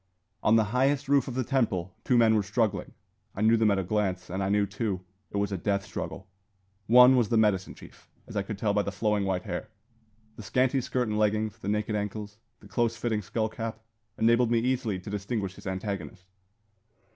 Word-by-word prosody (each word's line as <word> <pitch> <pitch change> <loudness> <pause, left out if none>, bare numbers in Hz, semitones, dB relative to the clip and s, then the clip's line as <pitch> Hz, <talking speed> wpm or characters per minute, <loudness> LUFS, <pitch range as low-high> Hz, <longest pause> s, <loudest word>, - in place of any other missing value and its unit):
On 110 - +4
the 110 - +5
highest 135 +2 +2
roof 140 0 +3
of 125 - -5
the 130 - 0
temple 105 -9 0
two 125 - +3
men 115 -1 +5
were 110 - +3
struggling. 105 +1 -1 0.4
I 100 - -4
knew 110 +1 +5
them 110 -1 +3
at 100 - +2
a 95 - 0
glance; 95 -2 -1
and 95 +2 -2
I 95 - 0
knew, 105 0 +3
too, 100 -2 -3 0.3
it - - -4
was 100 0 0
a 95 - -2
death 100 +1 -1
struggle. - - -6 0.6
One 125 +3 +8
was 120 -4 +2
the 115 - +2
medicine 105 -4 +2
chief, - - -16 0.2
as 110 - -11
I 100 - +1
could 100 +1 -6
tell 105 0 0
by 105 - +3
the 100 - -3
flowing, 105 0 0
white 95 -2 -1
hair. 90 - -4 0.7
The - - -7
scanty 130 +5 +1
skirt 125 0 -1
and 105 0 -1
leggings, 110 +1 0
the 100 - -4
naked 105 +1 -1
ankles, 105 0 -4 0.2
the - - -14
close 115 -1 0
fitting 110 -1 -1
skull 110 +3 -1
cap, 115 0 -5 0.4
enabled 115 +1 +3
me 120 - +3
easily 120 -4 0
to 90 +3 -9
distinguish 100 -1 -3
his - - -11
antagonist. 95 -3 -5
105 Hz, 210 wpm, -28 LUFS, 100-115 Hz, 0.7 s, One